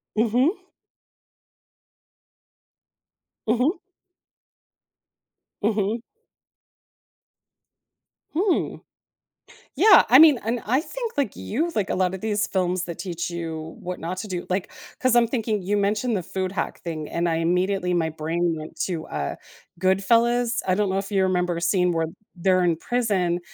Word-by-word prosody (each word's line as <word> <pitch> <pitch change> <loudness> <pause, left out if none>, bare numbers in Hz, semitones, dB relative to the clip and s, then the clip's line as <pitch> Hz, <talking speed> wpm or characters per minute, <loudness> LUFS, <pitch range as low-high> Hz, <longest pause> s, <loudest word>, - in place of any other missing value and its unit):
Mhm. 240 - +3 2.9
Mhm. 250 - +2 1.8
Mhm. 215 +1 0 2.4
Hmm. 370 +2 +1 1.0
Yeah, 415 -4 +7
I 250 - +8
mean, 300 -4 +8
and 230 +1 -1
I 250 +5 +2
think, 470 +8 -5
like 275 -8 0
you, 310 +11 -2
like 205 -3 0
a - - 0
lot 185 0 +1
of 190 - -6
these 215 -1 0
films 185 -1 0
that 170 -2 -6
teach 175 -3 -4
you 165 -2 -5
what 180 0 -5
not 175 +3 -4
to 215 - -5
do 180 -2 -4
like 185 +1 -2 0.3
'cause 255 -1 +2
I'm 240 -1 +5
thinking- 220 -3 -1
you 195 +3 -1
mentioned 210 +4 +1
the 185 - -2
food 185 +1 -3
hack - - -3
thing, 155 -3 -5
and 170 +1 -1
I 165 - +1
immediately 180 +2 +1
my 165 -2 +1
brain 165 +2 -1
went 155 0 -9
to, 170 -4 -4
uh, 70 - -3 0.4
Goodfellas. 230 +6 +2
I 185 - +3
don't 205 +1 +1
know 190 - 0
if 195 +1 -4
you 195 -2 +2
remember 180 -2 0
a - - -4
scene 180 +1 +2
where 165 -1 0 0.3
they're 185 +1 +2
in 170 -2 +2
prison 195 -6 0
190 Hz, 145 wpm, -24 LUFS, 175-230 Hz, 2.9 s, I